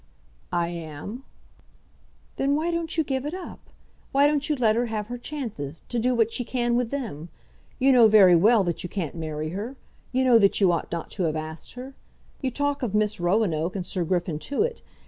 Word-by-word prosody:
"I 170 Hz, -1 st, 0 dB
am." 170 Hz, -, -7 dB, 1.1 s
"Then 275 Hz, +1 st, +2 dB
why 325 Hz, +3 st, 0 dB
don't 335 Hz, -1 st, -2 dB
you 320 Hz, -, +3 dB
give 265 Hz, -2 st, -2 dB
it 300 Hz, +5 st, -4 dB
up? 370 Hz, -, -8 dB, 0.5 s
Why 280 Hz, +1 st, +4 dB
don't 290 Hz, 0 st, +1 dB
you 300 Hz, -, +2 dB
let 225 Hz, -5 st, +3 dB
her 240 Hz, +1 st, +1 dB
have 215 Hz, -1 st, -4 dB
her 245 Hz, -, -4 dB
chances, 220 Hz, -, -5 dB
to 240 Hz, -, -1 dB
do 250 Hz, +2 st, +1 dB
what 230 Hz, -1 st, +2 dB
she 250 Hz, -, -2 dB
can 240 Hz, -1 st, 0 dB
with 245 Hz, -1 st, 0 dB
them? 215 Hz, -, -5 dB, 0.5 s
You 270 Hz, +1 st, +4 dB
know 240 Hz, -3 st, +7 dB
very 200 Hz, -5 st, +7 dB
well 210 Hz, +5 st, +5 dB
that 175 Hz, -2 st, -2 dB
you 180 Hz, -, -5 dB
can't 175 Hz, -6 st, -3 dB
marry 155 Hz, -2 st, -4 dB
her. 210 Hz, +10 st, -5 dB, 0.4 s
You 260 Hz, +1 st, +1 dB
know 245 Hz, -3 st, +6 dB
that 200 Hz, -2 st, +3 dB
you 190 Hz, -3 st, +5 dB
ought 170 Hz, -, -2 dB
not 170 Hz, -1 st, -4 dB
to 185 Hz, -, -1 dB
have 155 Hz, -1 st, 0 dB
asked 155 Hz, +1 st, -6 dB
her. 255 Hz, +2 st, -8 dB, 0.5 s
You 265 Hz, -, 0 dB
talk 285 Hz, +2 st, -1 dB
of 220 Hz, -5 st, -2 dB
Miss 210 Hz, -1 st, +1 dB
Roanoke 175 Hz, -2 st, +1 dB
and 185 Hz, -3 st, -3 dB
Sir 185 Hz, -1 st, -1 dB
Griffin 170 Hz, -2 st, -1 dB
Tewett. 435 Hz, -, -1 dB
220 Hz, 205 wpm, -25 LUFS, 175-265 Hz, 1.1 s, know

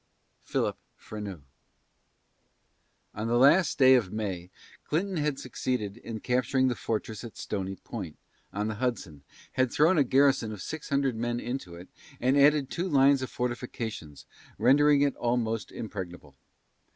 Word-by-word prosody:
PHILIP -, -, -1 dB, 0.2 s
FRENEAU. 100 Hz, -6 st, -7 dB, 1.7 s
On 110 Hz, +2 st, -4 dB
the 120 Hz, +1 st, +2 dB
last 145 Hz, +7 st, +5 dB
day 130 Hz, -2 st, +7 dB
of 115 Hz, -8 st, +2 dB
May, 95 Hz, -5 st, -4 dB, 0.3 s
Clinton 185 Hz, +4 st, -1 dB
had 150 Hz, -2 st, 0 dB
succeeded 120 Hz, -5 st, -3 dB
in 115 Hz, -2 st, -7 dB
capturing 130 Hz, +1 st, +1 dB
the 125 Hz, -, -1 dB
fortress 110 Hz, 0 st, -4 dB
at 115 Hz, -, -9 dB
Stony 95 Hz, -2 st, -4 dB
Point, 95 Hz, -7 st, -8 dB, 0.3 s
on 105 Hz, +2 st, -2 dB
the 110 Hz, -, -2 dB
Hudson, 100 Hz, -, -3 dB, 0.3 s
had 130 Hz, -2 st, +1 dB
thrown 160 Hz, +3 st, +4 dB
a -, -, +6 dB
garrison 135 Hz, -3 st, +3 dB
of 105 Hz, -, -7 dB
six 160 Hz, -1 st, -6 dB
hundred 140 Hz, -3 st, +1 dB
men 120 Hz, +1 st, -2 dB
into 120 Hz, -9 st, -5 dB
it, 90 Hz, +2 st, -11 dB, 0.3 s
and 130 Hz, +2 st, +2 dB
added 145 Hz, -1 st, +4 dB
two 180 Hz, +2 st, -2 dB
lines 140 Hz, -2 st, +5 dB
of 130 Hz, -, -4 dB
fortifications, 115 Hz, -, -5 dB, 0.3 s
rendering 140 Hz, +5 st, +5 dB
it 140 Hz, -2 st, +1 dB
almost 115 Hz, -2 st, -1 dB
impregnable. 90 Hz, -9 st, -7 dB
120 Hz, 145 wpm, -28 LUFS, 105-135 Hz, 1.7 s, day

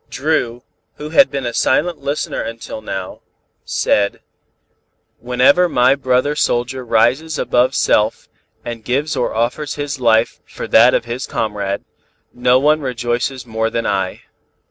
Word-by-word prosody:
Dru, 125 Hz, -5 st, -1 dB, 0.3 s
who 150 Hz, -, -7 dB
had 275 Hz, -, +6 dB
been 135 Hz, -2 st, -4 dB
a 120 Hz, -, -3 dB
silent 160 Hz, +7 st, +1 dB
listener 140 Hz, +1 st, -3 dB
until 115 Hz, -1 st, -7 dB
now, 95 Hz, -3 st, -6 dB, 0.4 s
said: 100 Hz, -1 st, 0 dB, 1.0 s
"Whenever 125 Hz, +9 st, +3 dB
my 125 Hz, -2 st, +4 dB
brother 135 Hz, +1 st, 0 dB
soldier 130 Hz, -2 st, -1 dB
rises 125 Hz, +7 st, +1 dB
above 125 Hz, +2 st, +1 dB
self 105 Hz, +1 st, +1 dB, 0.4 s
and 115 Hz, -2 st, -6 dB
gives 140 Hz, +7 st, -1 dB
or 125 Hz, -4 st, -1 dB
offers 125 Hz, +6 st, -1 dB
his 145 Hz, -1 st, -4 dB
life 115 Hz, -2 st, +2 dB
for -, -, -7 dB
that -, -, +6 dB
of -, -, -1 dB
his 120 Hz, +2 st, -5 dB
comrade, 100 Hz, -2 st, -3 dB, 0.5 s
no 125 Hz, +1 st, +3 dB
one 150 Hz, +3 st, +2 dB
rejoices 125 Hz, 0 st, -2 dB
more 110 Hz, -1 st, -1 dB
than 115 Hz, 0 st, -2 dB
I. 95 Hz, -2 st, -2 dB
125 Hz, 140 wpm, -18 LUFS, 115-140 Hz, 1.0 s, had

